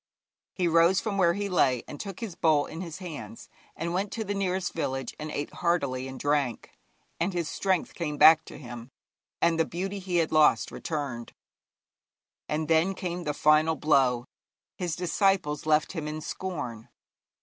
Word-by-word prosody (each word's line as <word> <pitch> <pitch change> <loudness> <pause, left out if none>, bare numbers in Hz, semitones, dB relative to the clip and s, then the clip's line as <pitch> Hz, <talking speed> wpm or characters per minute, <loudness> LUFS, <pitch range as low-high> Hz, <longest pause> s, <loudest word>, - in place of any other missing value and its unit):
He 180 -2 +1
rose 170 +3 +4
from 205 -3 -2
where 170 -2 +4
he 205 0 -2
lay, 135 -10 +2
and 145 - -8
took 195 +1 -7
his 220 -6 -4
bowl 155 -3 +3
in 160 +2 -7
his 170 -3 -6
hands 185 +5 -8 0.3
and 170 +1 -3
went 195 +2 -1
to 225 - -2
the 205 -1 -3
nearest 190 -2 -1
village, 135 -5 -3
and 155 0 -5
ate 145 -1 -4
heartily 140 -7 0
and 130 0 -8
drank, 145 -5 0 0.5
and 180 +3 0
his 170 -3 -1
strength 190 +1 -1
came 150 -4 -3
back 160 +1 +8
to - - -10
him, 120 -3 -9 0.5
and 165 -1 +3
the - - +5
beauty 190 +5 -4
he 185 -2 -4
had 165 -2 +2
lost 155 -1 +4
returned. 140 -7 -4 1.2
And 155 +1 -1
then 165 +4 +3
came 175 -1 -4
the 150 -1 -1
final 155 +2 +4
blow: 130 -6 +2 0.5
his 175 -4 -2
disciples 180 -3 +1
left 155 0 +3
him 160 -5 -4
in 155 +1 -4
scorn. 145 -12 -5
160 Hz, 170 wpm, -28 LUFS, 150-180 Hz, 1.2 s, back